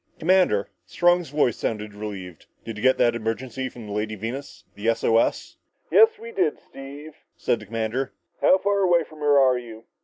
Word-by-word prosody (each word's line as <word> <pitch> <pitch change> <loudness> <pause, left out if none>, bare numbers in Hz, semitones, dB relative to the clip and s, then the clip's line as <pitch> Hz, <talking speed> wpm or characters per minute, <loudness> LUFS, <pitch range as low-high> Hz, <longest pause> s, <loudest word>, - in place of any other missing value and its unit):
"Commander!" 180 - +2 0.2
Strong's 175 - +2
voice 145 -5 +1
sounded 105 -1 -3
relieved. 100 -5 -8 0.2
"Did 115 - -6
you 105 - -7
get 130 0 +4
that 120 - +3
emergency 120 +3 -3
from 120 -3 -11
the 105 - -8
Lady 105 +1 -2
Venus 120 +7 -7
the 105 +2 -5
S 115 - 0
O 115 0 +4
S?" - - -1 0.3
"Yes, 450 0 +6
we 460 +1 -9
did, 430 +1 0
Steve," 140 +3 -11 0.2
said 115 - 0
the 105 - -12
commander. 115 +4 -2 0.3
"How 185 - +6
far 200 +1 0
away 175 -3 +3
from 155 -1 -15
her 145 -1 +3
are 130 -2 +4
you?" 115 -2 -11
125 Hz, 190 wpm, -24 LUFS, 110-155 Hz, 0.3 s, Yes